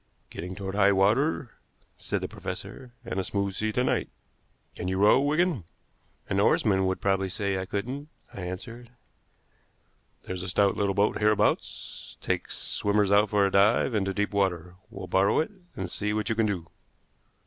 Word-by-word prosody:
"Getting 90 +2 -6
toward 95 -1 -5
high 100 0 +4
water," 115 +7 +2 0.5
said - - -2
the - - -2
professor, 125 -2 -7
"and 95 - -3
a - - 0
smooth 100 0 -2
sea 110 +3 -1
to 125 - +1
night. - - 0 0.7
Can 90 - -4
you 95 0 -1
row, 105 +6 +6
Wigan?" 155 - +1 0.6
"An - - 0
oarsman 95 -2 +3
would 95 - -1
probably 95 -1 +1
say 100 +1 -1
I 95 - -4
couldn't," 130 +9 -4 0.2
I 100 - -7
answered. 110 +7 -7 1.3
"There's 90 -1 -5
a 95 - -5
stout 100 +1 +3
little 100 -1 0
boat 100 +1 +2
hereabouts 105 0 0
takes - - -2
swimmers 105 -1 +1
out 105 +1 +5
for 100 -1 +3
a 100 - +1
dive 105 +6 +4
into 95 -3 0
deep 105 +1 -1
water. 90 -3 0 0.2
We'll - - -7
borrow 95 +1 +2
it, 160 - +1 0.2
and 95 - -3
see 105 +4 -2
what 110 0 -1
you - - +2
can 110 -1 +2
do." 90 -5 -2
100 Hz, 170 wpm, -27 LUFS, 95-110 Hz, 1.3 s, row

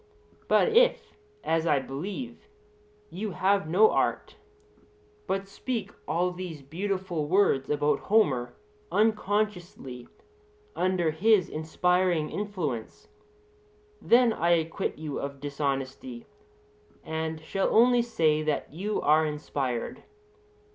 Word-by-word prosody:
But - - +4
if, 485 +2 +3 0.3
as 165 0 0
I 145 - +4
believe, 190 - -6 0.6
you 200 +1 -4
have 195 -3 +1
no 205 +6 +5
art, - - -1 0.9
but 195 0 -2
speak 205 0 -4 0.2
all 175 +3 +1
these 175 -5 -7
beautiful 180 0 -3
words 165 -7 +2
about 145 -1 +1
Homer 145 - +1 0.4
unconsciously 205 - -1 0.7
under 180 -3 +1
his 195 +3 +3
inspiring 175 +1 0
influence, 175 - -4 0.9
then 240 -1 +4
I 170 -2 +2
acquit 160 0 -3
you 155 -2 -5
of 140 0 -5
dishonesty, 145 - -4 0.8
and 160 0 -3
shall 190 +5 -1
only 245 +1 +5
say 160 -10 +1
that 155 -2 -2
you 200 +6 -2
are 155 +2 +4
inspired. 140 -5 -3
175 Hz, 105 wpm, -27 LUFS, 150-205 Hz, 0.9 s, no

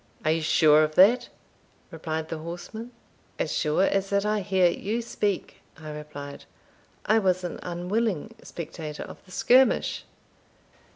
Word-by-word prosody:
"Are 155 - +4
you 165 0 +1
sure 155 -1 +5
of 155 0 -2
that?" 225 +7 +5 0.6
replied 160 -1 -4
the 160 - -4
horseman. 175 +8 -7 0.5
"As - - -2
sure 155 +4 +2
as 195 0 +1
that 200 0 +1
I 210 0 +1
hear 190 -2 +3
you 210 +6 -2
speak," 210 -4 -3 0.2
I 155 -1 -8
replied. 150 -2 -8 0.6
"I 220 +2 +4
was 185 -3 +1
an 175 - -5
unwilling 185 +3 -2
spectator 155 -2 -7
of - - -12
the 185 - -18
skirmish." 255 +7 +3
180 Hz, 140 wpm, -26 LUFS, 155-205 Hz, 0.6 s, sure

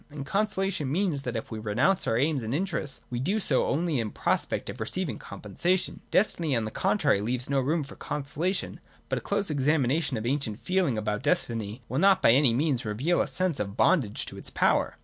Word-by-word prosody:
And 145 -2 -7
Consolation 195 -6 -1
means 170 -4 0
that, 125 -3 -4
if 115 - -5
we 110 - -4
renounce 120 - +1
our 115 - +2
aims 140 +1 +1
and 115 +3 -2
interests, 165 -5 -3
we 120 - -2
do 195 - 0
so 150 -10 +2
only 160 -1 0
in 110 -2 -1
prospect - - -1
of - - -7
receiving - - -3
compensation. 185 +1 -2
Destiny, 170 -7 +3
on 115 -2 0
the 110 - -4
contrary, 155 - +2
leaves 125 +5 -2
no 140 - +3
room 150 +4 0
for 135 - -11
Consolation. 155 +6 -3 0.3
But - - 0
a - - -15
close 200 -5 -1
examination 145 -1 +1
of 110 - -4
the 120 - 0
ancient 130 -7 -2
feeling 180 -10 0
about 105 -1 -2
destiny, 115 - -1
will 130 - -2
not 195 +1 +5
by - - +5
any 130 0 +5
means 135 +1 0
reveal 125 +11 0
a - - 0
sense 185 -5 -1
of 100 +1 -4
bondage 125 - +2
to - - -9
its - - -8
power. - - +1
140 Hz, 205 wpm, -27 LUFS, 120-175 Hz, 0.3 s, not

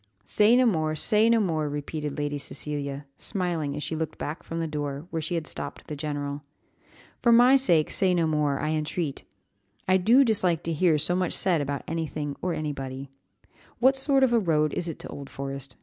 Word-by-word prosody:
"Say 210 - +4
no 255 0 +5
more, 155 -8 +1
say 215 +8 +3
no 230 0 +4
more," 160 -7 0
repeated 150 0 -4
Lady 145 0 -2
Cecilia, 140 0 -4
smiling 175 -7 -2
as 150 - -4
she 160 - -3
looked 160 0 -4
back 150 +3 -5
from 165 - -6
the 165 - -1
door, 145 -1 -4
where 160 - -2
she 160 +3 -3
had 165 -2 -2
stopped - - -4
the 150 - -6
general. 145 -1 -4 0.8
"For 235 - +4
my 245 +3 +7
sake 175 - +3
say 185 -2 +2
no 170 -2 +2
more, 150 -3 +1
I 155 - -1
entreat, 155 -1 -3 0.6
I 185 0 +5
do 230 +9 +5
dislike 185 - +1
to 165 - -2
hear 160 0 +3
so 170 +4 +1
much 180 -2 0
said 175 -5 +2
about 140 0 -3
anything 155 -3 -3
or 180 - -1
anybody. 135 -3 -5 0.7
What 265 +2 +4
sort 270 0 +4
of 250 -2 +3
a 235 - +5
road 155 -6 +1
is 175 - -3
it 165 - -5
to - - -7
Old 140 -1 -8
Forest?" 135 -1 -6
155 Hz, 200 wpm, -26 LUFS, 145-185 Hz, 0.8 s, my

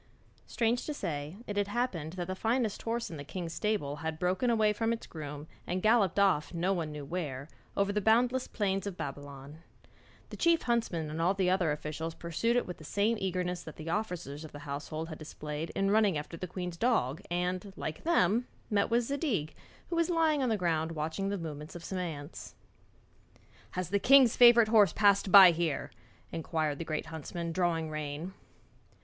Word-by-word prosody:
Strange 235 +1 0
to 300 - -3
say, 155 - -4
it 205 - -5
had 205 -1 +1
happened 200 -9 -2
that 180 -1 -4
the 185 - -3
finest 225 +2 0
horse 230 -2 -2
in 160 - -6
the 145 - -6
king's 170 +2 -5
stable 200 -10 -1
had 160 +1 -4
broken 185 +8 +1
away 215 -2 +3
from 225 +2 0
its 230 - -3
groom 150 -2 -7 0.2
and 180 +1 -2
galloped 215 -5 +3
off 185 -5 +2
no 180 +3 +1
one 165 -4 -2
knew 150 -1 -7
where, 140 -5 -4 0.3
over 200 0 +2
the 210 - 0
boundless 245 +4 +3
plains 195 -2 -1
of 190 -3 -5
Babylon. 140 +1 -7 0.7
The - - -7
chief 335 -1 +3
huntsman 205 -10 -1
and 160 +2 -3
all 180 +4 +2
the 185 -2 +2
other 180 -4 +2
officials 155 +2 -4
pursued 170 +8 -1
it 245 - +2
with 180 - -7
the 155 - -13
same 205 +8 +1
eagerness 180 -1 -1
that 160 - -10
the 160 +1 -5
officers 175 -8 -3
of 155 - -9
the 145 - -10
household 150 +3 -5
had 155 - -8
displayed 150 +1 -6
in 195 0 +1
running 205 -5 +3
after 150 +3 -6
the 180 +2 -5
queen's 180 -1 -5
dog 165 - +1
and, 180 +3 -2
like 155 -5 -5
them, 245 - +2 0.2
met 200 -1 +2
with 235 +1 +3
Zadig 235 - -1 0.4
who - - 0
was 335 0 +2
lying 320 -4 +2
on 255 - +1
the 220 - +1
ground 165 -3 0
watching 160 +5 -2
the 200 - -1
movements 155 -2 -7
of 170 - -8
some 190 +1 -4
ants. 155 -4 -6 1.2
'Has 185 0 -3
the 200 - +2
king's 265 0 +6
favourite 235 -2 +7
horse 210 -6 +5
passed 200 -2 +3
by 190 -2 +11
here?' 165 -4 -2 0.4
inquired 155 -2 -2
the 165 - -4
great 155 -1 -3
huntsman, 165 +2 -5
drawing 165 -2 0
rein. 155 +4 -5
180 Hz, 190 wpm, -31 LUFS, 155-215 Hz, 1.2 s, by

